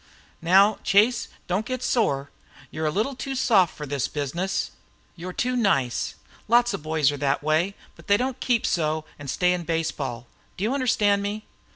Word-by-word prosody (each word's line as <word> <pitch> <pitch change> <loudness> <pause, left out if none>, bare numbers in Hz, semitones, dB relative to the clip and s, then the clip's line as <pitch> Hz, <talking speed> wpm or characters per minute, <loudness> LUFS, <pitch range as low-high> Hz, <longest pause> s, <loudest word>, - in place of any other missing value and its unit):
"Now, 195 +5 +5
Chase, 220 +4 +3 0.2
don't 185 +4 -1
get 255 +1 -4
sore. 140 - 0 0.4
You 155 - -6
're - - +2
a - - +2
little 215 - -1
too 270 +1 -5
soft 210 -9 +3
for 150 - -5
this 140 -3 -2
business. 170 +7 -2 0.4
You 180 +1 -7
're - - -4
too 250 +7 -1
nice. 140 - +1 0.3
Lots 240 +1 +4
of 200 - -4
boys 155 -2 +1
are 145 - -5
that 140 0 0
way, 160 +6 +1 0.2
but - - -17
they 205 - +5
don't 260 +2 -2
keep 240 -3 +1
so 155 -2 0
and 145 -2 -7
stay 180 +6 +2
in 180 - -2
baseball. 145 -7 -3 0.3
Do 190 - -4
you 225 +5 +1
understand 210 -7 +2
me?" 210 +2 -4
185 Hz, 190 wpm, -25 LUFS, 155-220 Hz, 0.4 s, Now